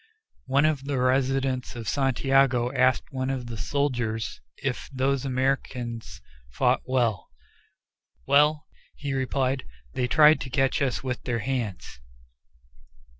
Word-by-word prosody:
One 140 +3 +3
of 150 -3 0
the 140 -2 -1
residents 130 0 0
of 115 -3 -7
Santiago 135 -2 +2
asked 130 -1 +2
one 130 -1 -2
of 130 -2 -3
the 120 -1 -6
soldiers 120 -4 -2 0.2
if 135 -2 -4
those 135 0 0
Americans 130 -3 -2 0.3
fought - - +1
well. 120 -7 0 1.0
"Well!" 150 +1 +4 0.3
he 140 -2 -4
replied, 130 0 0 0.3
"they 125 - 0
tried 150 +3 +6
to 130 - -5
catch 135 +2 +1
us 135 -2 0
with 130 -2 -3
their 120 -2 -1
hands!" 115 - -4
130 Hz, 125 wpm, -26 LUFS, 125-135 Hz, 1.0 s, tried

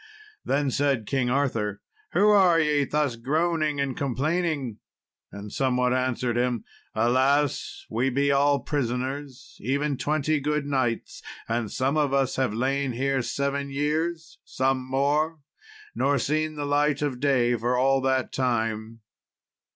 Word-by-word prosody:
Then 140 -1 0
said 135 -5 +1
King 130 +1 0
Arthur, 115 -7 0 0.3
"Who 210 +1 +4
are 185 -5 +5
ye, 150 -2 +2
thus 145 -3 0
groaning 155 +3 0
and 135 -2 -1
complaining?" 140 -2 -1 0.5
And 100 0 -8
some 130 -2 +1
one 125 0 +2
answered 125 -1 0
him, 120 -2 0 0.3
"Alas, 135 +4 +1
we 120 +4 0
be 140 +2 +1
all 140 +1 +3
prisoners, 135 0 -4
even 140 +4 -1
twenty 155 +1 0
good 150 +1 -1
knights, 130 -5 -2 0.3
and 115 -2 -2
some 135 +3 0
of 145 -3 +2
us 135 -1 +1
have 130 -4 +1
lain 130 +3 -1
here 135 +2 0
seven 140 +2 -2
years 160 +4 -2
some 130 0 0
more 150 +4 +1 0.5
nor 140 0 +1
seen 155 +4 -1
the 145 -1 -3
light 145 0 +1
of 135 -4 -2
day 125 -3 +2
for 120 +2 0
all 135 +1 +3
that 130 0 0
time." 115 -3 -2
135 Hz, 140 wpm, -26 LUFS, 125-145 Hz, 0.5 s, are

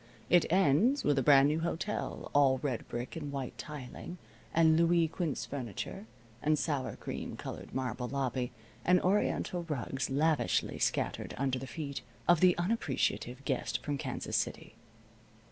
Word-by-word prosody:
It 175 -2 +5
ends 195 - +4
with 145 -2 +3
a - - +2
brand 135 +1 +7
new 155 +2 +1
hotel, 170 +5 -3
all 140 -2 +5
red 130 -5 -2
brick, 120 +1 -5
and 145 -3 -5
white 135 -3 -4
tiling, 150 +4 -7 0.3
and 160 -1 +5
Louise 170 -1 +3
Quinze 165 -6 -2
furniture, 135 - -5 0.3
and 155 0 +3
sour 145 -3 -1
cream - - -6
colored - - -7
marble 125 -1 -2
lobby, 130 -2 -1 0.3
and 180 0 +5
oriental 185 -2 +1
rugs 135 -1 -2
lavishly 150 +3 +1
scattered - - -1
under 130 -1 0
the 135 - -7
feet 140 -1 -5 0.3
of 175 -2 +6
the 180 0 +5
unappreciative 140 - -1
guest - - -1
from 145 -2 -2
Kansas - - -3
City. - - -2
145 Hz, 145 wpm, -32 LUFS, 135-170 Hz, 0.3 s, brand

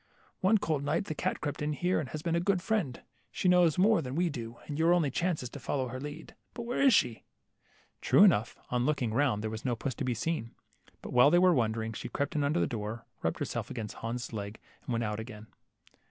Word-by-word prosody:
One 200 +4 +4
cold 155 -7 -1
night 155 +7 0
the 155 - -3
cat - - -2
crept 145 -1 -3
in 150 0 0
here, 180 +5 +1
and 145 -4 -4
has 155 0 -6
been 170 - 0
a - - +3
good 190 +1 +1
friend. 185 - -1 0.3
She - - -1
knows 180 -3 +5
more 200 0 +4
than 130 -2 -5
we 175 0 +1
do, 120 -3 -7
and 145 0 -5
your 170 +2 +5
only 155 -6 +1
chance 170 0 -1
is 125 - -5
to 145 - -8
follow 130 0 -2
her 130 +2 -5
lead. 145 +2 -8 0.2
But 235 - -5
where 240 +3 -2
is 275 -1 +6
she? 125 - +2 0.4
" - - -35
True - - +6
enough, 140 - +4
on 125 0 +1
looking 130 -7 0
round 120 -5 +1
there 110 - -2
was 110 0 -6
no 125 -2 0
puss 130 +3 -3
to 140 - -5
be 125 -2 0
seen. 115 -4 -3 0.5
But - - -7
while 125 +3 +7
they 175 - +5
were 180 0 +6
wondering, 115 -3 0
she - - -6
crept 140 +1 -2
in 150 - +1
under 150 +4 +1
the - - +3
door, 115 0 -5 0.2
rubbed - - -1
herself - - -3
against 110 -4 -6
Hans' 120 +1 -4
legs, 100 0 -5 0.2
and - - -6
went 115 0 0
out 105 -1 -2
again. 110 -2 -8
140 Hz, 245 wpm, -30 LUFS, 115-170 Hz, 0.5 s, while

